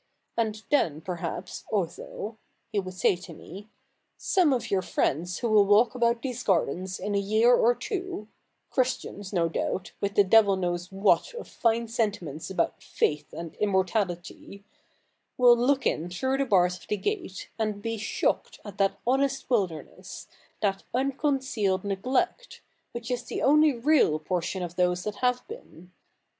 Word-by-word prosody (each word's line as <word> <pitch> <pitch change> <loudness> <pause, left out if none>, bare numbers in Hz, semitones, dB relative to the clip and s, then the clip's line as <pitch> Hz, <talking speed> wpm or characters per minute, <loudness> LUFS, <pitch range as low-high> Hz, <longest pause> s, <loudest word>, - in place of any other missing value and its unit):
And 220 -2 -1
then 160 - +2
perhaps, 175 0 -5
Otho,"' 205 +2 -3 0.4
he 205 - +1
would 185 -1 -6
say 185 - +3
to 175 -2 -11
me, 200 +8 -11 0.3
" - - -47 0.2
some 360 -6 +2
of 255 -3 -1
your 195 -1 +2
friends 175 +2 -1
who 235 - -1
will 205 -2 +5
walk 215 +4 +5
about 235 -1 +1
these 250 -2 -3
gardens 185 - 0
in 205 - -3
a 200 - +2
year 215 +5 +4
or 240 0 +4
two 370 - -5 0.2
— - - -49
Christians, 245 -6 -2
no 170 -4 +2
doubt, 180 +2 -3
with 200 0 -1
the 205 - +6
devil 200 0 +5
knows 175 -1 -2
what 200 - +2
of 475 - -7
fine 230 -1 0
sentiments 200 -10 -2
about 180 -3 -1
faith 150 0 -1
and 170 -1 -7
immortality 190 -1 -1 0.4
— - - -47
will 245 -1 +7
look 260 +3 +1
in 165 +3 0
through 260 +10 -1
the 275 - +2
bars 180 -5 +3
of - - -17
the 210 - -1
gate, 360 - -4
and 210 -2 -2
be 225 -1 -3
shocked 215 - -1
at 205 -1 -9
that 195 0 +2
honest 270 +1 0
wilderness, 185 -10 -2 0.4
that 195 -1 +1
unconcealed 265 -7 0
neglect, 255 - -1 0.3
which 235 +1 -6
is 245 -1 -1
the - - -4
only 300 +2 +5
real 250 - +3
portion 180 +3 -2
of 175 0 -6
those 180 0 +1
that 210 -1 -4
have 250 0 0
been." 185 - -12
205 Hz, 165 wpm, -27 LUFS, 185-245 Hz, 0.4 s, will